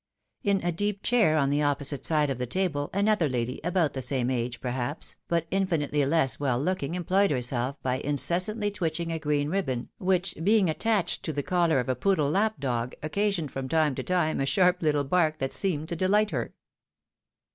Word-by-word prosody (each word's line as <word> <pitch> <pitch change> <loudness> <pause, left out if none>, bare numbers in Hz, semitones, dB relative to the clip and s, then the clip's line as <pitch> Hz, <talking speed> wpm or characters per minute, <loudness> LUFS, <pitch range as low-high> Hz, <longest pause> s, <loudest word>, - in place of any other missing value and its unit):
In 200 -3 +1
a 175 - +2
deep 205 +3 -2
chair 220 -11 +3
on 140 -2 +2
the 145 +1 +1
opposite 145 -1 0
side 150 -3 +1
of. 130 - -4
the 125 - -2
table, 155 -2 -1
another 200 -5 +2
lady, 125 0 -3
about 170 -3 +1
the 130 - -4
same 130 -1 0
age, 120 -1 -2
perhaps, 125 +4 -2
but 170 -1 0
infinitely 165 -7 0
less 145 -3 +2
well 130 -4 0
looking, 170 0 -2
employed 185 +3 +2
herself 125 0 -1
by 130 0 0
incessantly 180 - +1
twitching 170 -4 -2
a 165 - -2
green 145 -1 0
ribbon, 135 -10 -2
which 185 -1 0
being 200 -3 +4
attached 205 0 0
to 160 - -3
the 145 -1 -3
collar 170 -4 +2
of 125 - -2
a 130 - +1
poodle 150 +2 +1
lap 215 0 +1
dog, 125 -2 -2
occasioned 185 -2 -1
from 135 -1 -5
time 155 -2 +2
to - - -4
time 175 -4 0
a 135 - +1
sharp 180 +2 +3
little 150 -3 +2
bark 155 +1 +1
that 135 -2 -2
seemed 160 -6 -2
to 170 - -2
delight 205 +4 +2
her. - - -3
155 Hz, 190 wpm, -27 LUFS, 135-185 Hz, -, being